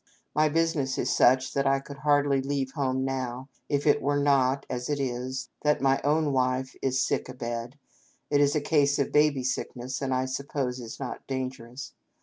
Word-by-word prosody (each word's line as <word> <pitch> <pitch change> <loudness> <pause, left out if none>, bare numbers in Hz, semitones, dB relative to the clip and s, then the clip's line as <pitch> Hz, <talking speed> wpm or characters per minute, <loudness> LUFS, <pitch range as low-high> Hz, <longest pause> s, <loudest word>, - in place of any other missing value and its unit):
My 155 +1 +3
business 155 -4 0
is - - 0
such 130 +1 +4
that 140 0 +1
I 135 0 +3
could 140 +1 -10
hardly 145 -1 +2
leave 135 -1 -2
home 130 -3 -1
now, 130 0 -3 0.2
if 145 -1 0
it 145 - +4
were 145 +1 +1
not, 140 -1 +2
as 125 +1 -4
it 145 -1 0
is, 130 0 -3
that 150 0 +2
my 135 0 +2
own 150 0 +2
wife 130 0 0
is 130 0 +1
sick - - -1
a 130 - -8
bed 120 +2 -5 0.5
(it 145 - +4
is 145 +1 +3
a 150 - +2
case 145 -2 +2
of 140 - 0
baby 150 -3 +3
sickness, 130 0 -3
and 135 -1 -1
I 130 0 +1
suppose 130 -1 -3
is 115 -2 -8
not 130 -3 -6
dangerous). 130 0 -5
135 Hz, 190 wpm, -27 LUFS, 130-145 Hz, 0.5 s, such